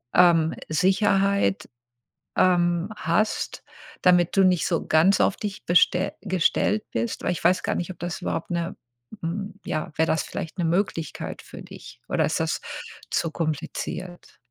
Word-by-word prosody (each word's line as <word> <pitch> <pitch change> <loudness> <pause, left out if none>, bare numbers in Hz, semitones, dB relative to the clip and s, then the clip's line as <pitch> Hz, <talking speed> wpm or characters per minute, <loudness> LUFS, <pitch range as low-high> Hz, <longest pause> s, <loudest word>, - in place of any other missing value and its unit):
ähm, 165 -3 +5 0.2
Sicherheit, 195 +4 +2 0.7
ähm, 175 0 +3
hast, 210 +4 -1 0.4
damit 180 0 +4
du 195 - +7
nicht 180 -2 +3
so 170 - -1
ganz 165 +5 +4
auf - - +3
dich 205 -1 -5
beste 180 +1 +3
gestellt 185 +3 +1
bist? 115 +1 -2
Weil - - +1
ich 175 - -4
weiß 185 - +3
gar - - 0
nicht, 175 - -3
ob 185 - -12
das 175 0 -4
überhaupt 165 - -3
'ne, 170 +2 -2 0.5
hm 195 +4 -4
ja, 155 0 -3
wäre 160 - +3
das 155 - +1
vielleicht 165 - -6
eine 170 -2 +1
Möglichkeit 170 -4 -2
für - - -11
dich - - -12
oder - - +2
ist - - -1
das - - -1 0.5
zu 165 - 0
kompliziert? 170 +3 -4
175 Hz, 155 wpm, -25 LUFS, 165-190 Hz, 0.7 s, du